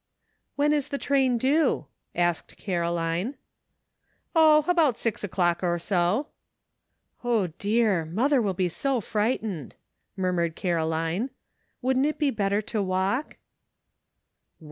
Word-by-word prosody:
"When 295 Hz, +1 st, +2 dB
is 290 Hz, -3 st, 0 dB
the 280 Hz, -, -2 dB
train 265 Hz, -3 st, +2 dB
due?" 280 Hz, +7 st, +2 dB, 0.3 s
asked 175 Hz, -1 st, -1 dB
Caroline. 170 Hz, +4 st, -1 dB, 0.5 s
" -, -, -46 dB
Oh! 310 Hz, -2 st, +6 dB
about 325 Hz, -9 st, +3 dB
six 230 Hz, -3 st, -2 dB
o'clock 175 Hz, -3 st, 0 dB
or 175 Hz, -1 st, +1 dB
so." 180 Hz, -, +1 dB, 1.0 s
"O, 235 Hz, -5 st, +2 dB
dear! 205 Hz, -5 st, +2 dB
mother 245 Hz, -, +2 dB
will 200 Hz, -4 st, -1 dB
be 185 Hz, 0 st, +1 dB
so 265 Hz, +9 st, -1 dB
frightened," 210 Hz, -, -2 dB, 0.4 s
murmured 175 Hz, -3 st, 0 dB
Caroline. 165 Hz, +5 st, -1 dB, 0.5 s
"Wouldn't 260 Hz, +2 st, +2 dB
it 305 Hz, -, -2 dB
be 295 Hz, -3 st, +1 dB
better 205 Hz, -1 st, 0 dB
to 215 Hz, 0 st, -2 dB
walk?" 190 Hz, +8 st, -1 dB
210 Hz, 120 wpm, -26 LUFS, 175-265 Hz, 1.0 s, Oh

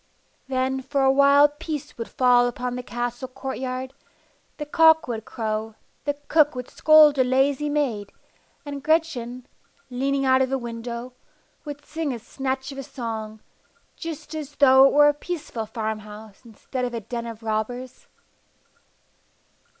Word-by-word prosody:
Then 265 Hz, 0 st, -1 dB
for 270 Hz, +1 st, -1 dB
a 265 Hz, -, +5 dB
while 280 Hz, +1 st, +6 dB
peace 295 Hz, 0 st, -6 dB
would 230 Hz, -, -5 dB
fall 245 Hz, -1 st, +4 dB
upon 245 Hz, 0 st, -3 dB
the 250 Hz, -, -4 dB
castle 240 Hz, +1 st, -4 dB
courtyard, 260 Hz, 0 st, -5 dB, 0.6 s
the 295 Hz, -, -4 dB
cock 320 Hz, +1 st, +5 dB
would 225 Hz, -3 st, -4 dB
crow, 220 Hz, -1 st, -3 dB, 0.3 s
the 290 Hz, -1 st, 0 dB
cook 300 Hz, -3 st, +4 dB
would 250 Hz, -1 st, -6 dB
scold 305 Hz, -2 st, +6 dB
a -, -, +6 dB
lazy 270 Hz, +3 st, +1 dB
maid, 250 Hz, -9 st, -1 dB, 0.5 s
and 285 Hz, -1 st, -6 dB
Gretchen, 260 Hz, -6 st, 0 dB, 0.5 s
leaning 275 Hz, +2 st, 0 dB
out 260 Hz, 0 st, +4 dB
of 260 Hz, 0 st, 0 dB
a 270 Hz, -, +1 dB
window, 235 Hz, 0 st, -6 dB, 0.5 s
would 290 Hz, 0 st, -8 dB
sing 315 Hz, -2 st, -3 dB
a 245 Hz, -, -3 dB
snatch 265 Hz, +3 st, -4 dB
of 275 Hz, -, -8 dB
a -, -, -5 dB
song, 220 Hz, -4 st, -6 dB, 0.5 s
just 325 Hz, -2 st, -7 dB
as 300 Hz, -2 st, -6 dB
though 265 Hz, -2 st, +7 dB
it -, -, 0 dB
were 295 Hz, 0 st, +7 dB
a 295 Hz, -, +4 dB
peaceful 290 Hz, -8 st, -5 dB
farm 220 Hz, -1 st, -3 dB
house, 210 Hz, 0 st, -12 dB
instead 240 Hz, +2 st, -6 dB
of 245 Hz, -1 st, -2 dB
a 230 Hz, -, -3 dB
den 235 Hz, +2 st, -5 dB
of 225 Hz, -1 st, -9 dB
robbers. 225 Hz, +4 st, -4 dB
260 Hz, 155 wpm, -24 LUFS, 235-285 Hz, 0.6 s, though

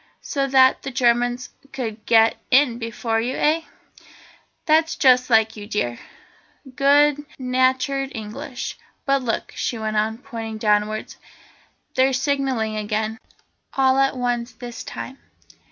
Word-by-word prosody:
"So 275 Hz, -2 st, -1 dB
that 260 Hz, -1 st, +5 dB
the 275 Hz, -, -5 dB
Germans 245 Hz, -1 st, +1 dB, 0.2 s
could 230 Hz, -5 st, -5 dB
get 225 Hz, -1 st, +5 dB
in 255 Hz, -3 st, +4 dB
before 230 Hz, -1 st, -2 dB
you, 250 Hz, +3 st, -2 dB
eh? 315 Hz, +2 st, +2 dB, 1.0 s
That's 320 Hz, +1 st, +3 dB
just 255 Hz, -2 st, +4 dB
like 220 Hz, -1 st, +3 dB
you 205 Hz, -1 st, -9 dB
dear, 120 Hz, -, -2 dB, 0.8 s
good 290 Hz, +1 st, +4 dB
natured 260 Hz, +1 st, 0 dB
English. 240 Hz, +5 st, -6 dB, 0.3 s
But 275 Hz, -1 st, +2 dB
look," 235 Hz, -3 st, -3 dB
she 240 Hz, -, -2 dB
went 215 Hz, -1 st, -2 dB
on, 220 Hz, +1 st, 0 dB
pointing 230 Hz, -4 st, -7 dB
downwards, 210 Hz, 0 st, 0 dB, 0.8 s
"they're 265 Hz, +1 st, +3 dB
signalling 265 Hz, -5 st, 0 dB
again, 215 Hz, +1 st, -2 dB, 0.5 s
all 265 Hz, 0 st, +3 dB
at 270 Hz, -1 st, +2 dB
once 245 Hz, -1 st, -2 dB
this 240 Hz, 0 st, -8 dB
time." 265 Hz, +1 st, -8 dB
245 Hz, 125 wpm, -22 LUFS, 225-270 Hz, 1.0 s, that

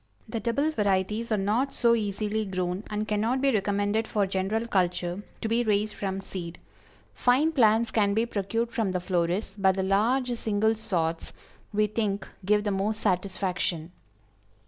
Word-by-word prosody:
The 225 Hz, 0 st, -3 dB
double 280 Hz, +8 st, 0 dB
varieties 210 Hz, -1 st, 0 dB
are 215 Hz, -, +3 dB
not 220 Hz, +8 st, 0 dB
so 235 Hz, -1 st, +4 dB
easily 215 Hz, 0 st, -1 dB
grown, 185 Hz, -1 st, -2 dB
and 210 Hz, 0 st, -2 dB
cannot 220 Hz, +5 st, +1 dB
be 275 Hz, +1 st, +3 dB
recommended 205 Hz, +1 st, 0 dB
for 205 Hz, -2 st, +1 dB
general 195 Hz, +4 st, -1 dB
culture 180 Hz, -3 st, 0 dB, 0.2 s
to -, -, -1 dB
be 230 Hz, +2 st, +2 dB
raised 210 Hz, -1 st, +1 dB
from 195 Hz, -1 st, -3 dB
seed. 175 Hz, -3 st, -7 dB, 0.6 s
Fine 265 Hz, +6 st, +3 dB
plants 225 Hz, -5 st, +3 dB
can 205 Hz, -2 st, +2 dB
be 225 Hz, +1 st, +2 dB
procured 230 Hz, +2 st, -2 dB
from 215 Hz, -6 st, -1 dB
the 180 Hz, -, 0 dB
florists, 180 Hz, +2 st, -1 dB
but 190 Hz, -2 st, +3 dB
the 190 Hz, -, -1 dB
large 240 Hz, +6 st, +2 dB
single 220 Hz, +1 st, +2 dB
sorts, 170 Hz, -7 st, -2 dB, 0.4 s
we 210 Hz, 0 st, +2 dB
think 210 Hz, -1 st, -2 dB, 0.2 s
give 210 Hz, +2 st, +3 dB
the 205 Hz, -, 0 dB
most 205 Hz, +3 st, -1 dB
satisfaction. 180 Hz, -4 st, -1 dB
210 Hz, 160 wpm, -27 LUFS, 190-225 Hz, 0.6 s, so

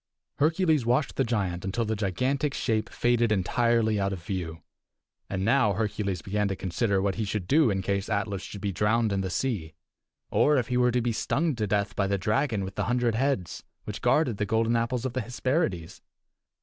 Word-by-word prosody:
Hercules 160 Hz, -1 st, +2 dB
watched 125 Hz, +6 st, +1 dB
the 135 Hz, -, +2 dB
giant 100 Hz, -7 st, -1 dB
until 100 Hz, +5 st, -1 dB
the 110 Hz, +1 st, -1 dB
gigantic 130 Hz, -, -1 dB
shape 110 Hz, -3 st, -1 dB
faded 120 Hz, -2 st, +1 dB
entirely 110 Hz, +2 st, +2 dB
out 100 Hz, 0 st, 0 dB
of 90 Hz, -3 st, -6 dB
view. 85 Hz, -3 st, -5 dB, 0.7 s
And 95 Hz, -1 st, -2 dB
now 120 Hz, -3 st, +3 dB
Hercules 100 Hz, -3 st, -2 dB
began 105 Hz, +1 st, 0 dB
to 95 Hz, -, -2 dB
consider 95 Hz, +2 st, 0 dB
what 95 Hz, 0 st, +1 dB
he -, -, +1 dB
should 100 Hz, -3 st, -3 dB
do 150 Hz, -2 st, +4 dB
in 95 Hz, -2 st, -1 dB
case 100 Hz, +1 st, -1 dB
Atlas 100 Hz, -2 st, -1 dB
should 100 Hz, +3 st, -8 dB
be 100 Hz, -1 st, -1 dB
drowned 105 Hz, +3 st, +1 dB
in 95 Hz, -, 0 dB
the 95 Hz, -, -3 dB
sea, 90 Hz, -5 st, -2 dB, 0.6 s
or 150 Hz, 0 st, +4 dB
if 120 Hz, -3 st, -1 dB
he 125 Hz, -, +1 dB
were 125 Hz, 0 st, +4 dB
to 125 Hz, +1 st, +1 dB
be 120 Hz, 0 st, 0 dB
stung 150 Hz, +7 st, 0 dB
to 105 Hz, -2 st, -1 dB
death 100 Hz, 0 st, 0 dB
by 100 Hz, -, +1 dB
the 100 Hz, 0 st, +1 dB
dragon 110 Hz, +2 st, 0 dB
with 95 Hz, 0 st, -5 dB
the -, -, -2 dB
hundred 120 Hz, -1 st, +1 dB
heads, 110 Hz, -, -1 dB, 0.2 s
which -, -, -6 dB
guarded 140 Hz, -9 st, +2 dB
the 105 Hz, -, 0 dB
golden 115 Hz, +2 st, +2 dB
apples 115 Hz, +2 st, -1 dB
of 130 Hz, -, -2 dB
the 130 Hz, -, -1 dB
Hesperides. 120 Hz, -, -2 dB
110 Hz, 200 wpm, -27 LUFS, 100-125 Hz, 0.7 s, do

